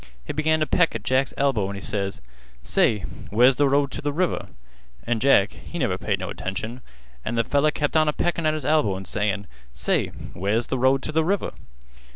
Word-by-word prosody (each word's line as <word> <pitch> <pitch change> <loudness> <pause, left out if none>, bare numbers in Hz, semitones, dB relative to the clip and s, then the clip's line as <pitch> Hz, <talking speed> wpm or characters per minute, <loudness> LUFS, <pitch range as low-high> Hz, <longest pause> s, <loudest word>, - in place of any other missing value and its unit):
He - - -4
began 155 +1 +2
t' 155 - +2
peck 165 -2 +2
at 110 - -4
Jack's 130 +4 +1
elbow, 125 -9 +1
an' 100 - -5
he 100 - -7
ses: 100 -1 -2 0.4
'Say, 105 -2 +2 0.3
where's 125 +5 +5
th' 145 -1 +3
road 140 0 +2
t' - - -5
th' 145 - -1
river?' 175 +4 -1 0.6
An' 120 -1 0
Jack, 110 -5 +4
he 175 - -9
never 115 - 0
paid 105 -2 0
no 95 -1 -5
attention, 95 +7 -5 0.4
an' - - -3
th' 115 -1 +1
feller 145 +4 +3
kept 150 0 -2
on 155 -1 +4
a - - +3
peckin' 170 -1 0
at 155 - +2
his 155 -4 -5
elbow 150 -10 +2
an' 95 - -8
sayin': 105 -1 -1 0.3
'Say, - - +1 0.3
where's 105 +6 0
th' - - -14
road 130 +2 +3
t' - - -2
th' 160 +1 +2
river? 195 +4 0
130 Hz, 210 wpm, -24 LUFS, 105-150 Hz, 0.6 s, where's